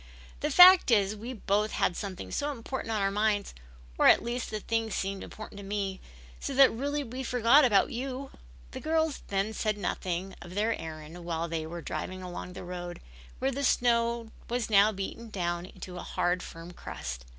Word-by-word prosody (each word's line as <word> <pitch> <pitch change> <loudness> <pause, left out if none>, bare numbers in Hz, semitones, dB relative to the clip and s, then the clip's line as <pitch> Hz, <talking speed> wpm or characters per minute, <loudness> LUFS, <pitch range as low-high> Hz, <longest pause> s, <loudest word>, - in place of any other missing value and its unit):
The - - -1
fact 365 -2 +9
is 205 -3 +3
we 225 +4 -6
both 210 -1 0
had 175 - +1
something 190 -1 -6
so 290 0 -1
important 260 -2 -5
on 215 -2 0
our 195 - +2
minds, 210 0 0 0.5
or - - +6
at - - +6
least 240 +1 -3
the 215 - -3
thing 225 +1 -1
seems 195 -1 -3
important 215 -1 -9
to - - -8
me, 195 -1 -3 0.4
so - - -4
that 270 0 +7
really 285 +5 -2
we 255 +1 -6
forgot 250 +3 +5
about 210 -6 +4
you." 265 +2 -4 0.4
The - - -6
girls 320 -2 0
then 200 +2 -1
said 215 -1 -1
nothing 185 -1 -3
of 175 +1 -10
their 220 +3 +2
errand 160 +2 -8
while 170 -1 -2
they 160 -1 -3
were 170 0 -7
driving 185 0 -5
along 180 0 -7
the - - -8
road, 175 -1 -6 0.4
where 270 - 0
the 280 +2 -3
snow 235 -2 +2 0.2
was 240 -2 -1
now 205 +1 +6
beaten 215 +3 -6
down 175 -3 -2
into 185 -1 -9
a - - -5
hard, 175 0 0
firm 165 0 -9
crust. 65 - -7
210 Hz, 190 wpm, -29 LUFS, 180-235 Hz, 0.5 s, fact